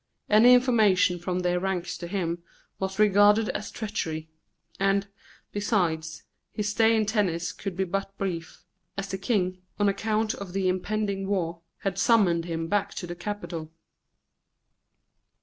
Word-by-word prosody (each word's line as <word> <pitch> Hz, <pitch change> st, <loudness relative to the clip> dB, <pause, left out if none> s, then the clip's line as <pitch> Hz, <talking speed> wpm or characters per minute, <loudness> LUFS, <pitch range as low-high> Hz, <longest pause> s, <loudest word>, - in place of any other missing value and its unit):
Any 235 Hz, +4 st, +8 dB
information 215 Hz, -8 st, +3 dB
from 180 Hz, +1 st, -2 dB
their 180 Hz, 0 st, +1 dB
ranks 185 Hz, -2 st, -2 dB
to 175 Hz, -, -5 dB
him 170 Hz, -2 st, -2 dB, 0.4 s
was 190 Hz, 0 st, -3 dB
regarded 210 Hz, +1 st, +5 dB
as 210 Hz, -, -3 dB
treachery; 160 Hz, -8 st, -4 dB, 0.5 s
and, 195 Hz, 0 st, +2 dB, 0.4 s
besides, 175 Hz, -7 st, -1 dB, 0.3 s
his 210 Hz, -1 st, -2 dB
stay 225 Hz, +2 st, +4 dB
in 220 Hz, -1 st, +2 dB
Tennis 195 Hz, -6 st, 0 dB
could 195 Hz, -3 st, -6 dB
be 190 Hz, -, +2 dB
but 195 Hz, +2 st, -3 dB
brief, 170 Hz, -4 st, -4 dB, 0.3 s
as 195 Hz, 0 st, -3 dB
the 190 Hz, 0 st, -3 dB
King, 185 Hz, -4 st, 0 dB, 0.2 s
on 205 Hz, -, +2 dB
account 215 Hz, +2 st, 0 dB
of 195 Hz, -3 st, -8 dB
the 195 Hz, -1 st, 0 dB
impending 195 Hz, +1 st, -1 dB
war, 170 Hz, -4 st, -1 dB, 0.2 s
had 195 Hz, -1 st, -2 dB
summoned 195 Hz, -7 st, +3 dB
him 165 Hz, -1 st, -3 dB
back 200 Hz, +1 st, 0 dB
to -, -, -4 dB
the 175 Hz, -, -5 dB
capital. 175 Hz, -4 st, -5 dB
195 Hz, 145 wpm, -27 LUFS, 175-210 Hz, 0.5 s, Any